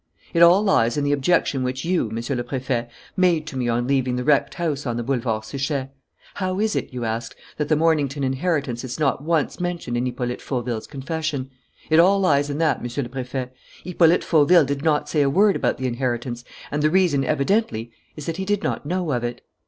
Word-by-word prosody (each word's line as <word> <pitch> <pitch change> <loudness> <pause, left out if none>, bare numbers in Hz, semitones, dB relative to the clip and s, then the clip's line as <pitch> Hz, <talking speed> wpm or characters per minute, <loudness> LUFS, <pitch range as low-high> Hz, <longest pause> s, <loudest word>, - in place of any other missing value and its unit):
"It 170 - +2
all 175 +4 +7
lies 120 - +2
in 145 - 0
the 145 - +1
objection 145 -1 +1
which 130 +2 -3
you, 170 -10 +1
Monsieur 115 +5 -3
le 120 - -2
Préfet, 125 -2 -2 0.3
made 175 -5 +2
to 155 -3 -8
me 125 -2 -1
on 120 +1 0
leaving 130 -2 +1
the 125 - -2
wrecked 145 +1 +2
house 150 -6 -2
on 120 -1 -2
the 120 - -2
Boulevard 115 -4 -1
Suchet: 135 +1 -3 0.4
'How 185 -1 -2
is 215 0 +1
it,' - - -2
you 125 -2 -4
asked, 115 +1 -3 0.2
'that 150 -1 -2
the 155 - +4
Mornington 150 -3 +1
inheritance 135 -2 -1
is 130 +3 -5
not 140 -2 +1
once 160 -1 0
mentioned 175 -8 -3
in 120 +1 0
Hippolyte 125 0 -3
Fauville's 120 -4 -3
confession?' 145 -1 -4 0.4
It 160 - +6
all 195 +4 +5
lies 145 -6 +2
in 145 - -3
that, 160 -1 +1
Monsieur 120 +3 -3
le 120 - -7
Préfet. 125 0 -4 0.3
Hippolyte 175 -1 +3
Fauville 160 +1 +5
did 140 +1 -3
not 155 -2 +1
say 150 - +1
a 140 - +3
word 200 +6 +4
about - - 0
the 130 - -4
inheritance; 120 -1 -2 0.3
and 145 - -1
the 155 - +3
reason 170 -6 +3
evidently 135 - 0 0.2
is 150 - -8
that 165 0 -3
he 190 - -2
did 205 +1 0
not - - -2
know 180 -2 -1
of 120 -2 -1
it. 120 0 -4
140 Hz, 215 wpm, -23 LUFS, 125-165 Hz, 0.4 s, all